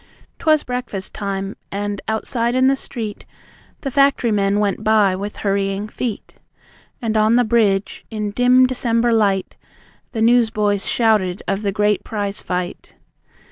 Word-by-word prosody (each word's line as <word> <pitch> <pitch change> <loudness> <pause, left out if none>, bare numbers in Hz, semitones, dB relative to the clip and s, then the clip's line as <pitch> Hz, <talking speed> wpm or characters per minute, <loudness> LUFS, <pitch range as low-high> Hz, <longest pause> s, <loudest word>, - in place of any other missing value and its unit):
'T'was 310 -2 +3
breakfast 245 -6 -5
time, 195 -1 -4 0.2
and 205 0 -3
outside 230 +2 -1
in 260 0 +3
the 270 +1 +4
street 225 -6 -5 0.6
The 275 - -3
factory 275 -3 +3
men 200 0 +1
went 205 0 -1
by 215 -3 +3
with 200 +2 -5
hurrying 195 +1 0
feet. 225 -1 -5 0.7
And 220 -1 -1
on 215 +1 +4
the 245 - +4
bridge, 215 -4 +1
in 210 -2 -3
dim 250 +3 +5
December 235 -2 +1
light, 200 -4 +1 0.6
The 220 -2 0
newsboys 220 -4 +2
shouted 210 -5 +1
of 195 +1 -1
the 200 -2 -1
great 210 0 +1
prize 205 -2 -3
fight. 180 -1 -5
215 Hz, 140 wpm, -20 LUFS, 200-235 Hz, 0.7 s, dim